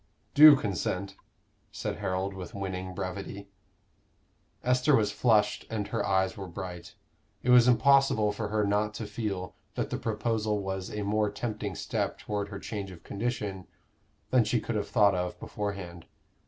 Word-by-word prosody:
"Do 150 Hz, 0 st, +10 dB
consent," 100 Hz, -3 st, -2 dB, 0.6 s
said -, -, -4 dB
Harold, 95 Hz, +1 st, -2 dB
with 95 Hz, 0 st, -8 dB
winning 95 Hz, -1 st, -4 dB
brevity. 100 Hz, +2 st, -5 dB, 1.1 s
Esther 125 Hz, +3 st, +4 dB
was 105 Hz, -3 st, +2 dB
flushed 105 Hz, -2 st, +2 dB
and 105 Hz, -3 st, -3 dB
her -, -, -1 dB
eyes 95 Hz, -1 st, +1 dB
were 95 Hz, -1 st, -7 dB
bright. 90 Hz, -1 st, -7 dB, 0.5 s
It 125 Hz, -, +3 dB
was 125 Hz, -1 st, +7 dB
impossible 125 Hz, -3 st, +4 dB
for 105 Hz, +1 st, -4 dB
her 105 Hz, 0 st, +1 dB
not 105 Hz, +1 st, 0 dB
to 110 Hz, -, -4 dB
feel 100 Hz, -4 st, -4 dB, 0.2 s
that -, -, -2 dB
the -, -, -2 dB
proposal 110 Hz, -1 st, -1 dB
was 95 Hz, -1 st, -4 dB
a 105 Hz, -1 st, -4 dB
more 105 Hz, +1 st, +1 dB
tempting 105 Hz, -2 st, -4 dB
step -, -, -2 dB
toward 105 Hz, -1 st, -3 dB
her 100 Hz, -, -6 dB
change 100 Hz, -1 st, -5 dB
of 85 Hz, -2 st, -12 dB
condition 105 Hz, -4 st, -3 dB, 0.6 s
than 125 Hz, -2 st, +5 dB
she 110 Hz, +2 st, +1 dB
could 120 Hz, -, -4 dB
have 105 Hz, -1 st, -2 dB
thought 100 Hz, -2 st, +4 dB
of 90 Hz, 0 st, -3 dB
beforehand. 100 Hz, -5 st, -5 dB
105 Hz, 155 wpm, -29 LUFS, 95-110 Hz, 1.1 s, Do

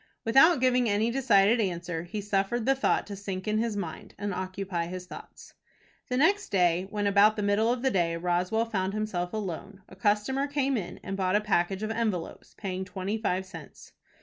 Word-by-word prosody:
Without 270 Hz, +7 st, +6 dB
giving 250 Hz, -2 st, +3 dB
any 210 Hz, +3 st, +1 dB
decided 230 Hz, -3 st, +4 dB
answer, 175 Hz, -4 st, -2 dB
he 205 Hz, +5 st, -5 dB
suffered 205 Hz, +3 st, -1 dB
the 270 Hz, -, +4 dB
thought 270 Hz, -, +1 dB
to 205 Hz, -, -7 dB
sink 195 Hz, -1 st, -5 dB
into 215 Hz, +1 st, +1 dB
his 225 Hz, -3 st, -2 dB
mind, 170 Hz, -5 st, -6 dB
and 205 Hz, -1 st, -3 dB
occupy 185 Hz, -2 st, -3 dB
his 180 Hz, +1 st, -6 dB
thoughts. -, -, -12 dB, 0.6 s
The 250 Hz, -, 0 dB
next 395 Hz, +8 st, +2 dB
day 180 Hz, -1 st, +2 dB
when 205 Hz, 0 st, -2 dB
about 200 Hz, +2 st, +5 dB
the 210 Hz, -, -2 dB
middle 205 Hz, +3 st, +2 dB
of 250 Hz, 0 st, -2 dB
the 265 Hz, -, +2 dB
day 170 Hz, -3 st, +1 dB
Roswell 180 Hz, +6 st, 0 dB
found 195 Hz, -3 st, -2 dB
himself 185 Hz, -5 st, -2 dB
alone, 195 Hz, -1 st, -6 dB
a -, -, -14 dB
customer 215 Hz, +8 st, +1 dB
came 280 Hz, -2 st, 0 dB
in 180 Hz, -6 st, -4 dB
and 195 Hz, -, -4 dB
bought 185 Hz, 0 st, 0 dB
a -, -, +5 dB
package 195 Hz, -1 st, 0 dB
of 215 Hz, -, -2 dB
envelopes, 215 Hz, -7 st, -3 dB
paying 190 Hz, -2 st, -4 dB
twenty 195 Hz, +3 st, -4 dB
five 190 Hz, -3 st, -1 dB
cents. 185 Hz, -, -12 dB
205 Hz, 195 wpm, -28 LUFS, 185-225 Hz, 0.6 s, Without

